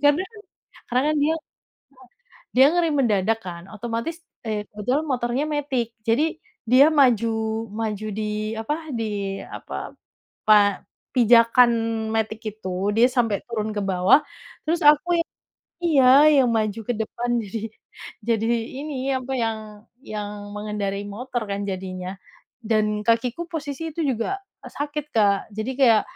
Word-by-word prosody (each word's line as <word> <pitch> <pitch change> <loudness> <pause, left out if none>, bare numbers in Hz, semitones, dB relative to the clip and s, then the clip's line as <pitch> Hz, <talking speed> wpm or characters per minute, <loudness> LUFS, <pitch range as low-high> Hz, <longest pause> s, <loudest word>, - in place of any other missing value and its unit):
Karena, 290 +4 +4 0.7
karena 250 +2 +2
kan - - -1
dia 310 +2 +3 1.2
dia 265 +1 +8
ngerem 340 -3 +1
mendadak 225 -4 +2
kan 170 -2 -7
otomatis, 230 - -4 0.3
eee, 210 -1 -2
kebetulan 250 +9 -1
motornya 250 +1 0
matic 270 -6 -2
jadi 305 +9 +2 0.3
dia 255 +4 +7
maju, 225 -5 +2
maju 215 -1 -3
di 215 0 -3
apa 225 +7 -2 0.2
di 200 -3 -3
apa, - - -7 0.5
pa 205 -2 +5 0.3
pijakan 235 0 +6 0.4
matic 220 0 -1 0.2
itu, 185 -4 -5 0.2
dia 235 +2 +6
sampai 230 -5 0
turun 220 -2 -3
ke - - 0
bawah, 190 +7 +4 0.4
terus 330 +2 0
aku 300 +4 +6
yang 335 - -4 0.5
iya, 290 -6 +4 0.4
yang 250 - +2
maju 215 0 -1
ke - - +2
depan, 240 +2 -3
jadi 210 +3 -5 0.7
jadi 225 -1 +1 0.3
ini 275 -3 -3
apa 260 0 -3
yang 225 -2 0 0.5
yang 205 -2 -6
mengendarai 205 -1 -3
motor 245 +4 -4
kan 200 0 -2
jadinya. 185 0 -5 0.5
Dan 215 -1 +1
kakiku 235 +7 +1
posisi 320 0 -4
itu 335 - -4
juga 270 - -1 0.3
sakit 290 +1 -4
Kak, 205 -3 +4 0.2
jadi 220 +4 -2
kayak 230 -5 +6
230 Hz, 130 wpm, -23 LUFS, 210-265 Hz, 1.2 s, dia